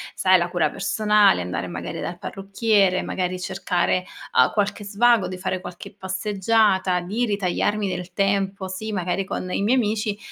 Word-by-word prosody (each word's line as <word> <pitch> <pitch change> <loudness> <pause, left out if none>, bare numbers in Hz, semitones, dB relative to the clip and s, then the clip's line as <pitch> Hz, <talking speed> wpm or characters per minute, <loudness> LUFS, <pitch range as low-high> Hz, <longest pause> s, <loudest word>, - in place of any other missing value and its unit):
Sai - - +5
la - - -1
cura - - +1
personale, 210 - +3
andare 90 0 -4
magari 85 -1 -6
dal 175 - -5
parrucchiere, 195 0 +1
magari 185 0 -2
cercare, 180 -1 -1 0.3
uhm, - - +5
qualche 205 0 -1
svago, 225 +1 +3
di 185 - -6
fare 185 0 -3
qualche 180 -1 -9
passeggiata, 190 -1 +1
di 210 +8 -1
ritagliarmi 205 0 0
del 180 0 -5
tempo 195 0 0
sì, 200 +4 -5
magari 185 0 -1
con 185 -1 -4
i - - -1
miei 230 +5 +3
amici, 210 -3 0
195 Hz, 155 wpm, -23 LUFS, 180-210 Hz, 0.3 s, Sai